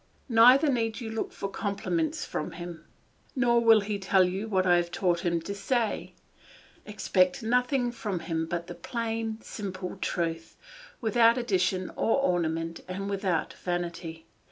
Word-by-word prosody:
Neither 250 +6 +7
need 225 -3 -1
you 225 -3 -5
look 220 - -3
for 200 - -4
compliments 295 - -2
from 150 - -4
him; 175 -1 -8 0.5
nor 240 -2 +3
will 225 -2 +7
he 205 0 -3
tell 190 0 +4
you 190 +4 -2
what 190 -3 +1
I 175 -1 +5
have 175 0 0
taught 175 0 0
him 170 -1 0
to 200 +5 -5
say; 220 +3 -1 0.7
expect 200 0 +1
nothing 250 +2 +1
from 210 -7 -4
him 160 -1 -2
but 170 0 -3
the - - -7
plain, 225 -2 -3
simple 190 -3 -6
truth, 165 -1 -3 0.4
without 230 +1 +4
addition 185 -5 0
or 225 - +1
ornament 165 -7 0
and 195 +2 -4
without 190 -4 -1
vanity. 170 -2 -4
200 Hz, 150 wpm, -28 LUFS, 175-230 Hz, 0.7 s, Neither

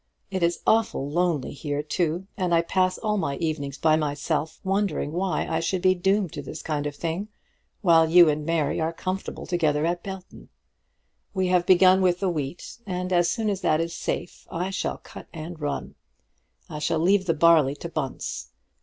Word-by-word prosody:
It 190 -1 -2
is 170 0 +1
awful 220 -11 +2
lonely 165 -2 0
here, 145 0 -3
too, 170 +3 -1
and 180 -4 +1
I 165 - +3
pass 185 +1 +1
all 215 -1 -1
my 140 -8 -1
evenings 145 -4 -3
by 155 0 +3
myself, 150 +1 -2
wondering 195 -5 0
why 180 +3 -1
I 160 - 0
should 175 +2 -1
be 185 0 +5
doomed 190 0 +1
to - - -5
this 155 - -8
kind 150 -2 -2
of 145 - -6
thing, 170 +6 -3 0.5
while 165 -4 +5
you 175 0 +8
and 150 0 0
Mary 160 -1 0
are 160 +1 -1
comfortable 185 +3 -4
together 155 -4 +1
at 175 +1 -1
Belton. 190 -1 -9 0.9
We 185 -1 +1
have 180 -1 +2
begun 185 +1 +6
with 180 -1 +2
the 195 - +1
wheat, 160 - -5
and 180 0 -2
as 175 -1 +3
soon 225 -2 -1
as 200 -2 -1
that 155 - +2
is 165 0 -2
safe 170 - -4
I 180 +3 -2
shall 195 - -2
cut - - -12
and 165 0 -7
run. 145 -1 -3 0.7
I 150 - -6
shall 155 +2 0
leave 185 +4 +2
the 165 - +2
barley 155 -3 +5
to 160 - -7
Bunce. 155 -5 -4
170 Hz, 190 wpm, -25 LUFS, 155-185 Hz, 0.9 s, you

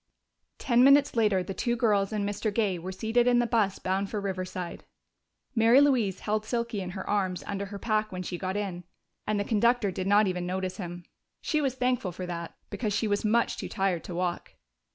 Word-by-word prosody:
Ten 245 -2 +3
minutes 275 +1 +5
later 210 -5 +3
the 195 - -5
two 235 +5 -1
girls 210 -4 +2
and 205 -2 -1
Mr. 205 +1 -2
Gay 200 -4 0
were 185 +3 -5
seated 225 +5 +1
in 245 -1 +5
the 240 - +3
bus 220 -5 +1
bound 190 +1 -1
for 210 - -2
Riverside. 185 -2 -4 0.7
Mary 230 +2 +6
Louise 245 -10 +2
held 215 0 -1
Silky 235 -2 -2
in 185 - -5
her 190 - -6
arms 190 -3 0
under 200 0 -4
her 200 +1 -7
pack 215 0 0
when 185 -1 -4
she 180 - -4
got 190 +1 -2
in, 190 -4 -4 0.4
and 210 -1 +1
the - - +1
conductor 225 0 +2
did 185 +1 -3
not 205 +2 +5
even 180 -2 -2
notice 185 0 -3
him. 175 -2 -7 0.3
She 305 -2 0
was 270 -3 0
thankful 250 -7 0
for 180 +1 -6
that, 170 -1 -6 0.2
because 215 -4 -2
she 220 - 0
was 205 0 0
much 230 +2 +2
too - - -5
tired 190 -5 0
to 175 - -6
walk. 175 0 -3
205 Hz, 210 wpm, -28 LUFS, 185-230 Hz, 0.7 s, Mary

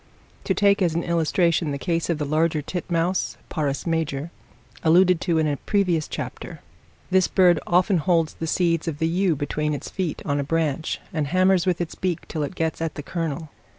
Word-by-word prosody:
To - - +1
take 200 0 +3
as 170 -3 +2
an 170 - 0
illustration 170 0 +1
the 140 - -2
case 165 +2 -1
of 170 - +1
the 150 - -2
larger 155 +1 +1
titmouse, 175 +2 -1
(Parus 145 -4 -2
major) 160 -2 -2 0.5
alluded 175 +1 +4
to 170 -3 +1
in 160 - +2
a 145 -1 -1
previous 180 -5 0
chapter; - - -6 0.5
this 185 0 +4
bird 175 -4 +4
often 180 +1 +3
holds 165 0 +1
the 165 - -5
seeds 165 -1 +1
of 155 -3 -2
the 160 +1 +1
yew 175 0 +1
between 150 +1 -2
its - - -7
feet 180 -5 -3
on 145 0 0
a - - 0
branch, 160 0 -1
and 155 -3 -1
hammers 185 +2 +3
with 180 -2 +1
its 175 -2 -3
beak 180 -3 -3
till 155 - -4
it 150 +5 -3
gets 160 -1 -2
at 165 -1 -2
the 145 - -6
kernel. 160 -2 -4
165 Hz, 195 wpm, -24 LUFS, 155-180 Hz, 0.5 s, alluded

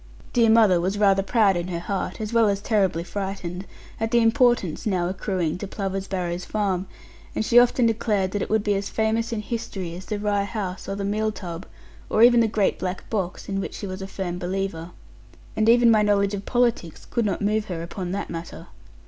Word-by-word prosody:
Dear 235 -2 +4
mother 215 -6 +5
was 190 +3 -1
rather 195 -2 +4
proud 200 -1 +3
in 175 0 -2
her 175 -2 -3
heart, 190 +6 -3
as 215 +1 -4
well 230 -2 +4
as 200 -1 0
terribly 195 -5 +1
frightened, 190 -1 -5 0.3
at 225 0 -1
the 240 - +2
importance 230 - +2
now 180 -4 +1
accruing 185 -3 -2
to 200 - -5
Plover's 195 -1 -4
Barrows 180 -2 -3
farm; 195 -3 -1 0.5
and 220 - 0
she 240 +1 +7
often 245 0 +3
declared 210 -4 +1
that 205 - -2
it - - -3
would 220 -1 +2
be 205 - +1
as 200 0 -2
famous 225 +1 0
in 225 -2 -2
history 195 -7 -4
as 185 +1 -9
the 210 - -2
Rye 205 -1 0
House, 200 -4 -5
or 195 - -2
the 200 0 -3
Meal 215 +2 0
tub, 180 -3 -7 0.4
or 220 - +4
even 240 0 +7
the 230 - +4
great 210 -2 0
black 185 0 -4
box, 190 -5 -3
in 195 -1 -2
which - - -6
she - - -6
was 190 0 -6
a 190 - -5
firm 180 -2 -4
believer: 180 -2 -3 0.7
and 215 +1 +2
even 235 0 +6
my 215 -1 +5
knowledge 200 -1 +2
of 200 -1 -5
politics 235 -9 0
could 235 - -1
not 200 -4 -1
move 215 +1 +1
her 170 -5 -5
upon 175 +1 -5
that 200 +1 -3
matter. 170 0 -7
200 Hz, 215 wpm, -24 LUFS, 185-220 Hz, 0.7 s, she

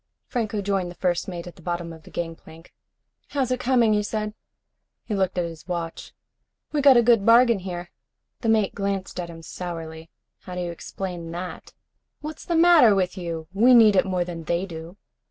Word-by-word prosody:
Franco 215 -4 -2
joined 195 -2 0
the 175 - -10
first 175 -1 0
mate 175 -3 -6
at 175 - -11
the - - -15
bottom 175 0 -4
of 160 - -13
the - - -15
gangplank. 165 -1 -7 0.5
"How's 265 -3 -1
it 255 - 0
coming?" 245 -3 +3
he 210 - +2
said. 210 0 -3 0.7
He 215 - -3
looked 190 -2 0
at 175 - +1
his 165 0 -9
watch. 170 -2 -5 0.6
"We 295 - +1
got 275 -3 +7
a 240 - +5
good 230 -3 +4
bargain 235 0 +6
here." 175 -1 -6 0.5
The 230 - -1
mate 215 -3 +2
glanced 195 -2 -3
at 175 -1 -4
him 165 -1 -10
sourly. 165 -2 -7 0.3
"How 180 - -9
do 180 - -3
you 175 -1 -3
explain 175 0 -6
that?" 180 +1 -7 0.5
"What's 305 +1 -8
the 340 - -1
matter 325 -10 +7
with 185 -2 0
you? 165 -3 -5
We 240 +6 +6
need 220 -3 +7
it 190 - +3
more 180 -2 0
than 165 -2 -7
they 170 +4 0
do." 165 +1 -9
185 Hz, 195 wpm, -24 LUFS, 170-220 Hz, 0.7 s, got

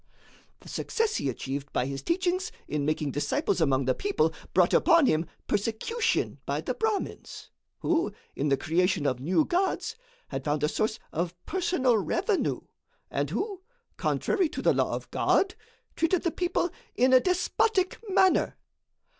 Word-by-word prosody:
The - - -15
success 450 -1 -1
he 140 - -1
achieved 135 +2 -4
by 125 - +1
his 135 0 -4
teachings 370 +4 0 0.2
in 150 -1 -1
making 155 -2 0
disciples 180 - 0
among 135 -3 +2
the 130 - +3
people, 405 0 0 0.2
brought - - +3
upon 335 -4 +5
him 160 -6 +2 0.2
persecution 230 - 0
by - - -1
the - - -2
Brahmins, 445 -2 -3 0.3
who, 335 -9 +1 0.2
in 145 +2 0
the 135 - +3
creation 175 +1 +1
of 130 -3 +1
new 180 - +2
gods, 370 +2 0 0.3
had - - -4
found 150 0 -1
a - - +4
source 215 +7 -1
of 170 +2 -2
personal 315 - +2
revenue, 375 - 0 0.5
and - - -1
who, 395 -2 -3 0.3
contrary 380 -7 +1
to - - -5
the - - +5
law - - +1
of - - -8
God, 385 -1 +2 0.4
treated 335 +2 +1
the 340 - +1
people 350 0 0 0.2
in 255 +1 +4
a 255 - +9
despotic 370 - +1
manner. 375 -1 +3
265 Hz, 155 wpm, -28 LUFS, -, 0.5 s, a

